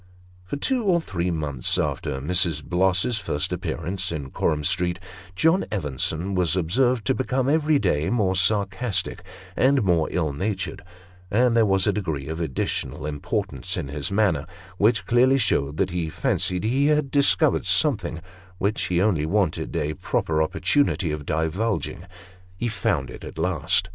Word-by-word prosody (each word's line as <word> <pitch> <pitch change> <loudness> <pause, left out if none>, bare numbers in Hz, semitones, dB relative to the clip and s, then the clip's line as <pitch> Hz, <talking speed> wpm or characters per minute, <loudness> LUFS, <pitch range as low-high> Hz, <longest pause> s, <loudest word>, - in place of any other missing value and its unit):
For 90 - -4
two 250 - 0
or 185 -4 +3
three 90 - -3
months 75 -6 -1
after 65 - -2
Mrs. 80 0 +1
Bloss's 95 +5 +1
first 75 -7 -2
appearance 90 +1 -3
in 70 -5 -5
Coram 75 -2 0
Street, 90 +3 +1 0.4
John 165 - +3
Evenson 80 +1 -1
was 90 -3 +1
observed 115 +7 +1
to 130 - +2
become, 130 0 -1
every 155 +1 +3
day, 75 - 0
more 100 -6 +1
sarcastic 100 +1 0 0.3
and 135 -1 +3
more 85 -5 +2
ill 80 -5 -1
natured; 95 +4 -3 0.5
and 120 +3 +3
there 115 -2 +4
was 95 -1 +3
a - - +2
degree 80 -9 -3
of 80 +2 -4
additional 70 -1 -3
importance 75 -1 -3
in 70 - -4
his 75 +3 -3
manner, 100 -8 +1 0.3
which 110 +2 +3
clearly 125 +3 +4
showed 75 - 0
that 95 0 0
he 85 -2 -2
fancied 90 +3 -1
he 130 +6 +2
had 150 -2 +2
discovered 145 +2 +3
something, 100 - +1 0.4
which 100 +4 0
he 90 -1 0
only 90 -6 +2
wanted 95 -3 0
a 75 +1 -1
proper 80 +1 -1
opportunity 95 - +1
of 75 -1 -5
divulging. 90 +3 -1 0.5
He 120 +4 -1
found 85 - -1
it - - -10
at - - -9
last. 90 +1 +1
95 Hz, 155 wpm, -24 LUFS, 80-115 Hz, 0.5 s, there